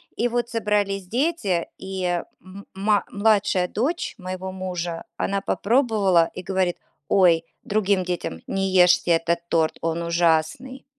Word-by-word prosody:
И 245 - 0
вот 240 0 -1
собрались 205 -4 -1
дети, 235 - 0
и 190 -1 -5 0.4
м 190 +3 -12
ма 205 +1 +1
младшая 205 -3 +2
дочь 275 - -2
моего 185 -1 -5
мужа, 175 -3 -4
она 200 0 -1
попробовала 200 -7 +2
и - - -6
говорит: 185 -1 -1 0.3
"Ой"- 175 -4 +4 0.2
другим 200 -2 +1
детям, 175 - -4
"Не 195 0 -1
ешьте 180 -1 +5
этот 170 +1 +2
торт, 160 -1 +1
он 165 +1 -1
ужасный". 170 +10 0
190 Hz, 130 wpm, -23 LUFS, 175-210 Hz, 0.4 s, ешьте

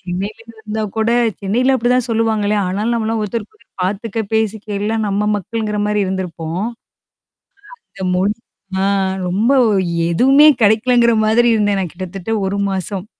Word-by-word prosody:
சென்னையிலருந்து 220 +4 -6
வந்தா 215 0 -3
கூட, 220 +1 +1 0.3
சென்னையில 245 +7 +1
அப்படிதான் 250 +1 +1
சொல்லுவாங்களே, 220 -2 +1
ஆனாலும் 210 +6 -1
நம்மலாம் 225 -1 -1
ஒருத்தருக்கு 225 - -5
ஒருத்தர் 200 - -16
பார்த்துக்க, 210 +3 -3 0.2
பேசிக்க, 220 -1 -1
எல்லாம் 220 +1 -1
நம்ம 205 +1 0
மக்கள்ங்கிற 210 +1 -3
மாரி 210 0 0
இருந்திருப்போம். 180 -1 -4 1.3
அங்க 190 - -6
மொழி 200 +3 +1 0.5
ஆ - - +1 0.4
ரொம்ப 210 +8 +1 0.6
எதுவுமே 270 - +5
கிடைக்கலங்கிற 235 +2 +4
மாதிரி 230 +3 +3
இருந்தேன் 205 -2 +1
நான் 180 -4 -3
கிட்டத்தட்ட 185 +3 -6 0.2
1 200 +1 -2
மாசம். 190 +1 -3
215 Hz, 130 wpm, -17 LUFS, 195-230 Hz, 1.3 s, எதுவுமே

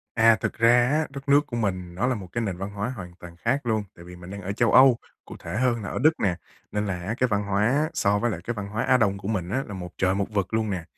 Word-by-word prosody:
À, 115 0 +6
thực - - -1
ra 120 +1 +5
á, 155 +1 +1
đất 140 +1 -9
nước 145 +1 +5
của 120 - -5
mình 90 -5 -2
nó 110 +8 0
là 130 - +1
một 100 -4 -7
cái 115 - -1
nền 95 -4 -3
văn 95 +2 -5
hóa 100 +3 -3
hoàn 90 -2 -9
toàn 85 -1 -11
khác 135 +9 -1
luôn. 110 -2 +1
Tại 85 - -13
vì 90 0 -11
mình 90 +1 -11
đang 100 0 -7
ở 100 +2 -3
châu 115 +2 +1
Âu, 130 -2 +7 0.3
cụ - - -10
thể - - -6
hơn 120 -2 +1
là 95 - -5
ở - - -3
Đức 155 +5 +5
nè, 90 -4 +1 0.4
nên 105 0 -1
là 90 -2 -3
á 105 +6 -3
cái 125 - +3
văn 105 -1 0
hóa 100 +1 +1
á 145 +6 +2
so 105 -7 +2
với 120 +2 0
lại 85 -4 -4
cái 120 - -3
văn 100 -2 -5
hóa 110 +3 -2
Á 130 -1 +4
Đông 100 -4 +1
của 95 +1 -6
mình 95 -6 -2
á 130 +6 0
là 105 - -7
một 90 -2 -6
trời 95 0 +2
một 100 0 0
vực 100 0 -2
luôn 110 -2 0
nè. 90 -4 -3
105 Hz, 315 wpm, -25 LUFS, 95-120 Hz, 0.4 s, Âu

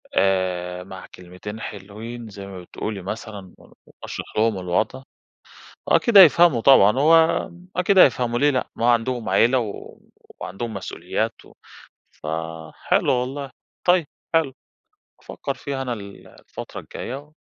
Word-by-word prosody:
آآ، 90 -2 0
مع 95 0 -10
كلمتين 90 +4 -9
حلوين 110 +4 -8
زي 100 -1 -9
ما 95 -2 -9
بتقولي 100 +3 -6
مثلًا 100 -1 -7
وأشرَح - - -10
لهم 110 -2 +2
الوضْع، 110 +9 -1 0.8
أكيد 235 -4 +4
هيفهَموا 170 -7 +7
طبعًا، 120 -4 +6
هو 165 +4 +4 0.3
أكيد 185 +2 +2
هيفهَموا 120 -6 +4
ليه 145 +1 +4
لأ، 130 -3 -1
ما 120 +1 +3
عَندهم 120 -1 0
عيلة 125 +2 +4
و 110 -4 -7 0.4
وعندهم 110 +4 -5
مسؤوليات 95 - -4
و - - -18 0.6
فحلو 80 0 -2
والله، 135 +2 -3 0.4
طيب 175 -4 +4 0.3
حلو، 160 -5 +2 0.7
أفكّر - - -5
فيها 135 -2 -5
أنا 125 -2 -2
ال 100 -2 -10
الفترة - - -10
الجاية 140 +4 -8
115 Hz, 125 wpm, -22 LUFS, 95-135 Hz, 0.8 s, هيفهَموا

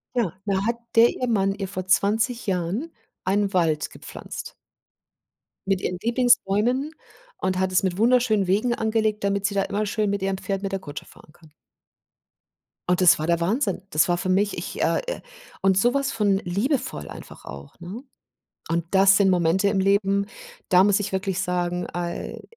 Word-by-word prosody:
Ja, 225 -9 +1
da 195 -1 0
hat 235 +1 0 0.2
der 230 +1 +7
ihr 250 - -3
Mann 195 -4 +1
ihr 195 -1 -5
vor 185 0 -5
20 220 +5 +1
Jahren 195 - -2 0.3
einen 200 +1 +1
Wald 165 -5 +1
gepflanzt. - - -9 1.1
Mit 195 -1 +1
ihren 180 - -2
Lieblingsbäumen 245 +3 +2 0.5
und 185 -1 0
hat 190 0 0
es 185 - +3
mit 185 -1 -1
wunderschönen 230 -3 +3
Wegen 210 +7 +1
angelegt, 220 -1 0
damit 200 0 0
sie 200 0 0
da 195 - +2
immer 205 +2 -2
schön 210 0 -1
mit 200 -1 -2
ihrem 195 0 -1
Pferd, 195 0 -3
mit 195 -1 -3
der 195 - -1
Kutsche 145 -4 -8
fahren - - -18
kann. 160 -2 -20 1.4
Oh, - - +5
das 180 -1 +5
war 155 - -2
der 170 0 +2
Wahnsinn. 195 - -1
Das 155 +3 +3
war 175 - +2
für 185 +1 -2
mich 200 +2 +1
ich, - - -6
äh, - - +2
äh - - -4 0.4
und 190 -1 +3
so 240 +6 +3
was 275 0 0
von 205 -3 +1
liebevoll 195 - -2
einfach - - -11
auch, 70 +1 -11
ne? 190 +8 -8 0.7
Und 165 0 0
das 195 0 +6
sind 200 -2 +4
Momente 180 +2 +2
im 195 -1 +1
Leben, 200 0 +2 0.4
da 185 +1 +6
muss 205 0 +3
ich 200 - -4
wirklich 190 0 -1
sagen, 180 -1 -2
ai 175 -1 -4
195 Hz, 180 wpm, -24 LUFS, 180-215 Hz, 1.4 s, der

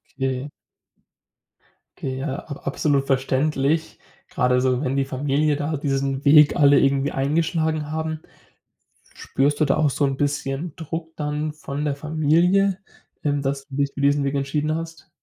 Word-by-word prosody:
Okay. 135 +1 -2 1.5
Okay, 130 -1 -4
ja, 135 0 -3
ab 140 -2 -9
absolut 140 0 +1
verständlich. 140 +3 0 0.3
Gerade 125 -1 +2
so, 130 0 +1
wenn 130 0 -1
die 140 - +2
Familie 145 +3 0
da 150 +1 -2
diesen 135 -1 -1
Weg 150 +1 +7
alle 145 -1 +6
irgendwie 140 +1 +2
eingeschlagen 155 +2 0
haben. 160 0 -3 1.0
Spürst 145 +2 0
du 155 - +4
da 135 - +1
auch 150 -2 +3
so 140 +1 0
'n 135 -1 -1
bisschen 145 +2 -2
Druck 160 0 -6
dann 150 0 -2
von 145 -1 -5
der 145 -2 -1
Familie, 165 +6 +2 0.5
ähm, 145 -1 0
dass 135 0 -2
du 135 - -9
dich 140 0 +1
für 140 - -4
diesen 140 0 +3
Weg 140 0 -1
entschieden 145 +3 -1
hast? 165 0 -7
145 Hz, 155 wpm, -23 LUFS, 135-155 Hz, 1.5 s, Weg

